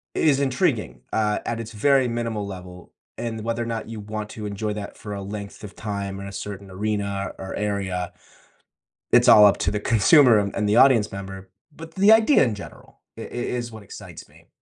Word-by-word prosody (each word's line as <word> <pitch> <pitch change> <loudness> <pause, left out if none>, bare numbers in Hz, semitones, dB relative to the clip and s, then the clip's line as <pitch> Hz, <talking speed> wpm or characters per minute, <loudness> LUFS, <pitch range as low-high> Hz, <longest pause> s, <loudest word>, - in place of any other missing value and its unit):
is 140 -3 +3
intriguing, 125 - 0
uh, 105 -1 +1
at 115 - -2
its 115 0 -7
very 135 +4 +3
minimal 115 -3 -3
level, 90 -2 -10 0.3
and 115 -2 -4
whether 115 0 -1
or - - -5
not 115 -1 -4
you 115 - -7
want 105 +1 -6
to 105 -1 -8
enjoy 105 +1 -3
that 105 -1 -7
for 105 -1 -7
a 100 - -5
length 100 +1 -8
of 100 - -9
time 100 -2 -5
or 100 - -7
a - - -8
certain 100 -1 -7
arena 100 0 -3
or 95 - -6
area, 95 -4 -2 1.0
it's - - +5
all 105 -1 +9
up 100 - +5
to - - 0
the 105 - -2
consumer 115 +2 +5
and 100 -1 -3
and 105 0 0
the 105 - +3
audience 125 -6 +5
member, 95 -1 -8 0.3
but 165 0 -11
the 200 +3 +5
idea 225 +6 +5
in 115 -5 0
general 100 - -13 0.2
i - - -7
i - - -7
is 120 0 -4
what 110 -2 -11
excites - - -11
me. - - -21
105 Hz, 205 wpm, -23 LUFS, 100-115 Hz, 1.0 s, all